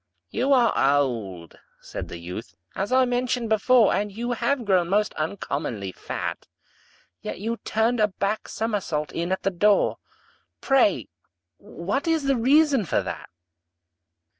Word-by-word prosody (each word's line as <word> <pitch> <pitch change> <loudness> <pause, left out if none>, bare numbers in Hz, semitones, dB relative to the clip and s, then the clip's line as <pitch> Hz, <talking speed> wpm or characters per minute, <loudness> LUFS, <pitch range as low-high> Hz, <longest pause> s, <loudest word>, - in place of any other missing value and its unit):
"You 265 +4 0
are 245 -4 +4 0.2
old," 105 - -2 0.2
said - - -7
the - - -7
youth, 90 +2 -8 0.2
"as 195 +5 -3
I 260 0 +5
mentioned 245 -1 -1
before, 220 +1 +4
And 205 +1 -1
you 235 +4 -4
have 245 +1 0
grown 185 -4 +2
most 210 +2 +1
uncommonly 145 - -3
fat; - - -5 0.7
Yet 105 - -6
you 230 +3 -2
turned 225 +2 0
a 210 - +4
back 200 +2 -2
somersault 200 -9 -2
in 170 +2 -3
at 190 - -1
the 195 - +1
door 200 +3 +2 0.6
Pray 210 - +2 0.5
what 205 - -4
is 325 -2 +2
the 275 0 +2
reason 275 +1 +4
for 170 - 0
that?" - - -6
210 Hz, 140 wpm, -24 LUFS, 170-245 Hz, 0.7 s, I